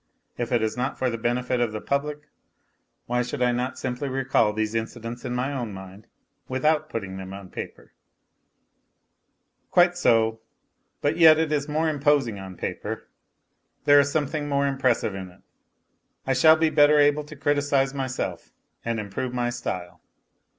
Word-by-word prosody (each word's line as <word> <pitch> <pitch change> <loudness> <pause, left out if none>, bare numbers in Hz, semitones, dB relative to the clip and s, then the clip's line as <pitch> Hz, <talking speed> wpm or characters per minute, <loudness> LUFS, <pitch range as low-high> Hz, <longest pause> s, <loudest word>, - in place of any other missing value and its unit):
If 120 0 -4
it 120 -2 +2
is 110 0 -1
not 125 - -2
for 130 -1 0
the 115 - -3
benefit 125 +2 0
of 115 -3 0
the 110 - -3
public 145 +3 -2 0.8
why 125 0 0
should 125 +2 -2
I 125 - +3
not 125 +1 -2
simply 130 +2 -3
recall 130 -4 +2
these 110 +1 -2
incidents 115 +2 -5
in 125 -1 -3
my 130 +3 -1
own 120 -6 -4
mind 95 +2 -11 0.4
without 155 +4 +1
putting 100 -7 -5
them 95 0 -7
on 100 -2 -11
paper? - - -8 1.8
Quite 175 0 +4
so; 115 -9 +2 0.6
but 145 +3 0
yet 160 -2 +8
it 160 -1 0
is 150 -1 -1
more 155 +2 +1
imposing 145 -7 +1
on 95 -2 -9
paper. - - -5 0.8
There 145 0 +7
is 140 0 +2
something 145 0 -1
more 140 0 +1
impressive 130 -6 +1
in 95 -1 -6
it; 90 +1 -20 0.8
I 135 - +1
shall 155 +5 +6
be 160 0 +1
better 150 0 +5
able 145 +1 +4
to 155 +1 -11
criticize 140 -1 +1
myself 130 -2 -4 0.3
and 115 -1 -2
improve 110 +5 -4
my 120 -1 0
style. 90 -8 -5
130 Hz, 165 wpm, -25 LUFS, 115-145 Hz, 1.8 s, yet